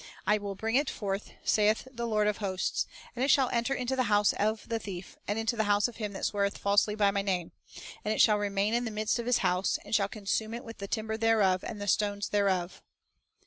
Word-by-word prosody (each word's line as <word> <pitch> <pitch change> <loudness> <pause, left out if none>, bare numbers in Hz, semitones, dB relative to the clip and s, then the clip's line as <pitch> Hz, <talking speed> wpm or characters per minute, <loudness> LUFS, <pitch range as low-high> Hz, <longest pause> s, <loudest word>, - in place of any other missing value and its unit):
I 210 0 +3
will 200 -1 -5
bring 225 +5 0
it 285 0 +1
forth, 200 -1 -4
saith 215 +3 +2
the 235 -1 -3
Lord 215 -2 +2
of 210 - 0
hosts, 190 -3 -1 0.3
and 250 - -1
it - - +2
shall 270 -2 +5
enter 235 +2 0
into 250 +1 -1
the 255 -1 +1
house 205 0 +4
of 215 +1 -1
the 230 -1 -1
thief, 190 -4 -8
and 205 - -1
into 225 +2 0
the 220 -1 +1
house 205 +1 +3
of 240 - -11
him 210 -3 -4
that - - -3
sweareth 200 -1 0
falsely 205 +1 +2
by 205 -2 +3
My 200 0 0
name; 185 -4 -2 0.5
and 210 - -1
it - - -1
shall 210 -2 +5
remain 205 +1 0
in 240 +1 +1
the - - -2
midst 215 +2 -1
of 235 - -4
his 245 - +3
house, 180 +1 +1
and 205 - -8
shall 200 -2 +3
consume 215 +2 -2
it 240 - -7
with 230 -1 -10
the 200 - -5
timber 220 +1 -2
thereof 215 -5 +3
and 210 - -6
the 205 - -5
stones 205 +1 0
thereof." 190 -3 0
210 Hz, 240 wpm, -29 LUFS, 200-225 Hz, 0.5 s, shall